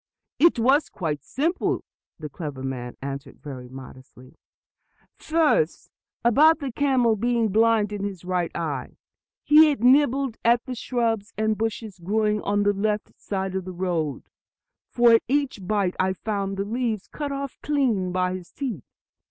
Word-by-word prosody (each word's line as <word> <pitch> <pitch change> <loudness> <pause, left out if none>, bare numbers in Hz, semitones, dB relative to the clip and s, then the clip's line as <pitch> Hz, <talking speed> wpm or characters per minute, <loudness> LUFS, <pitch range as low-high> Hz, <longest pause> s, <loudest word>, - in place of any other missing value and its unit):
"It 335 -2 +5
was 265 +6 +3
quite 155 -6 -4
simple," 325 +7 -1 0.3
the 155 - -6
clever 145 -3 -7
man 125 -2 -5
answered 140 0 -6
very 130 -4 -9
modestly. 130 0 -13 0.8
"First, 325 +9 +1 0.3
about 300 +8 +6
the 280 -4 -5
camel 250 -4 +2
being 235 +1 +1
blind 220 0 +3
in 205 -1 -4
his 195 -4 -5
right 180 -2 0
eye. 160 -4 -4 0.5
He 310 +1 +7
had 280 -6 -2
nibbled 270 -1 +3
at 235 +1 +3
the 255 - -5
shrubs 230 -3 -2
and 220 0 +1
bushes 220 -2 -4
growing 210 +3 0
on 205 0 0
the 205 0 +3
left 210 +1 -1
side 190 -1 -3
of 190 0 -2
the 185 - -6
road, 170 -5 -2 0.7
for 240 -1 +5
at 225 - +5
each 265 -8 -1
bite 200 -3 0
I 190 0 +2
found 195 -1 -3
the 195 - -1
leaves 225 -2 -2
cut 290 -2 -5
off 275 -1 -5
clean 240 -11 0
by 180 0 0
his 185 -2 -8
teeth. 235 - -5
210 Hz, 155 wpm, -24 LUFS, 185-250 Hz, 0.8 s, He